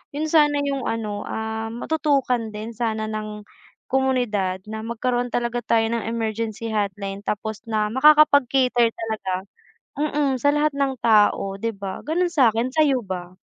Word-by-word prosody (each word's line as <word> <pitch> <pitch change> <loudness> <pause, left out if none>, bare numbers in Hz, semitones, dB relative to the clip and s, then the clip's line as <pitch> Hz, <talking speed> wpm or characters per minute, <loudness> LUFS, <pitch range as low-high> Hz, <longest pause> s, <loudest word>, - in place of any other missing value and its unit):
'Yun 310 +2 -1
sana 295 -2 +4
'yung 275 -3 -2
ano, 215 -2 -3
ah, 220 0 -3
matutukan 255 -6 0
din 220 +2 -6
sana 220 -1 -2
ng 215 -1 -5 0.4
komunidad 245 -8 0
na 220 0 -6
magkaroon 245 +1 -2
talaga 240 0 -1
tayo 225 0 +2
ng 230 -1 -2
emergency 225 0 -3
hotline 200 -2 -3
tapos 215 +1 -4
na 215 -2 0
makakapag-cater 265 -3 +4
talaga. 200 -4 -4 0.5
Hmm, 300 +1 -1
hmm. 290 -2 +1
Sa 285 - +4
lahat 295 0 +2
ng 275 -2 -1
tao 210 -3 +4
di 230 - 0
ba 195 -3 -6
ganun 335 +4 0
sa'kin, 245 -2 +2
sayo 275 -7 +2
ba? 180 -2 -5
230 Hz, 145 wpm, -23 LUFS, 215-270 Hz, 0.5 s, sana